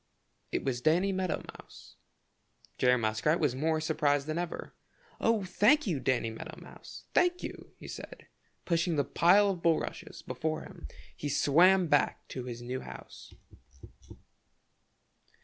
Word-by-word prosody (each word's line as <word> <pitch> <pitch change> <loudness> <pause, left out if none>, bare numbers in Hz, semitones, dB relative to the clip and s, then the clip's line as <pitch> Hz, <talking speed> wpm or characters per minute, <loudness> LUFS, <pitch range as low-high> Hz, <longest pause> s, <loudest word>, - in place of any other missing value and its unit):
It - - -1
was 125 -3 -2
Danny 175 +7 +3
Meadow 185 -2 -2 0.2
Mouse. - - -15 0.8
Jerry 125 0 +4
Muskrat 110 +8 +1
was 150 -6 +1
more 155 +4 0
surprised 145 -3 +1
than 155 +2 -2
ever. 175 -1 -5 0.5
"Oh, 225 -3 +2
thank 210 +11 +3
you, 170 -9 -1
Danny 120 -4 0
Meadow 110 - -9
Mouse, - - -12
thank 360 0 +2
you!" - - -7
he - - -11
said, - - -8
and - - -23 0.4
pushing 170 -1 +1
the 145 - +2
pile 200 +4 +4
of 180 -3 -6
bulrushes 165 -2 -1
before 155 0 -3
him - - -11 0.3
he 145 - -4
swam 175 +7 +4
back 145 -3 +1
to 130 -2 -6
his 120 -1 -7
new 125 +2 -4
house. 65 -1 -11
155 Hz, 145 wpm, -30 LUFS, 130-185 Hz, 0.8 s, Jerry